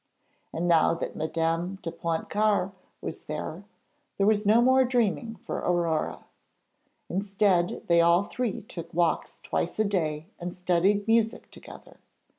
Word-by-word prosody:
And 170 Hz, +2 st, -2 dB
now 165 Hz, -1 st, +4 dB
that -, -, -5 dB
Madame 165 Hz, +3 st, -1 dB
de 165 Hz, -, -3 dB
Pontcarré 190 Hz, +4 st, 0 dB, 0.3 s
was -, -, -6 dB
there, 155 Hz, +5 st, -5 dB, 0.5 s
there 195 Hz, -, +2 dB
was 210 Hz, -1 st, +2 dB
no 220 Hz, +3 st, +6 dB
more 260 Hz, +2 st, +5 dB
dreaming 235 Hz, -2 st, 0 dB
for -, -, -5 dB
Aurore. 170 Hz, -3 st, 0 dB, 0.8 s
Instead, 195 Hz, -2 st, +1 dB
they 170 Hz, -1 st, +4 dB
all 170 Hz, +3 st, +4 dB
three 240 Hz, 0 st, -3 dB
took 170 Hz, -1 st, -9 dB
walks 170 Hz, -1 st, 0 dB
twice 80 Hz, 0 st, -2 dB
a 215 Hz, -, +2 dB
day 160 Hz, -6 st, -1 dB
and 175 Hz, 0 st, -5 dB
studied 185 Hz, +3 st, +1 dB
music 225 Hz, 0 st, +1 dB
together. -, -, -13 dB
180 Hz, 135 wpm, -27 LUFS, 165-210 Hz, 0.8 s, no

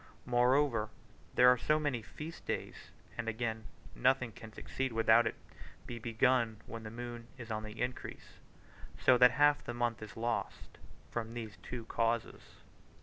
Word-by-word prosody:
Moreover, 125 Hz, -2 st, +3 dB, 0.5 s
there 125 Hz, -, +7 dB
are 125 Hz, -1 st, +5 dB
so 155 Hz, -, +3 dB
many 145 Hz, -6 st, -1 dB
feast 155 Hz, +9 st, -9 dB
days; -, -, -4 dB, 0.3 s
and 120 Hz, -, -2 dB
again, 110 Hz, -1 st, -3 dB, 0.3 s
nothing 125 Hz, -, +2 dB
can 110 Hz, 0 st, -11 dB
succeed 135 Hz, +4 st, -3 dB
without 115 Hz, +1 st, +5 dB
it -, -, -2 dB, 0.5 s
be 120 Hz, -, -6 dB
begun 115 Hz, -1 st, +2 dB
when 115 Hz, 0 st, -7 dB
the 110 Hz, -, -7 dB
moon 120 Hz, 0 st, -7 dB
is 115 Hz, -3 st, -8 dB
on 110 Hz, 0 st, -1 dB
the 110 Hz, 0 st, -9 dB
increase; 125 Hz, +1 st, -5 dB, 0.6 s
so 130 Hz, -, +5 dB
that 125 Hz, 0 st, +9 dB
half 145 Hz, +4 st, +4 dB
the 120 Hz, -, -5 dB
month 120 Hz, -3 st, -1 dB
is 110 Hz, +1 st, -9 dB
lost 115 Hz, +1 st, -3 dB, 0.3 s
from 115 Hz, 0 st, -4 dB
these 110 Hz, -3 st, -6 dB
two 120 Hz, +1 st, -6 dB
causes. 115 Hz, 0 st, -1 dB
120 Hz, 155 wpm, -33 LUFS, 110-125 Hz, 0.6 s, that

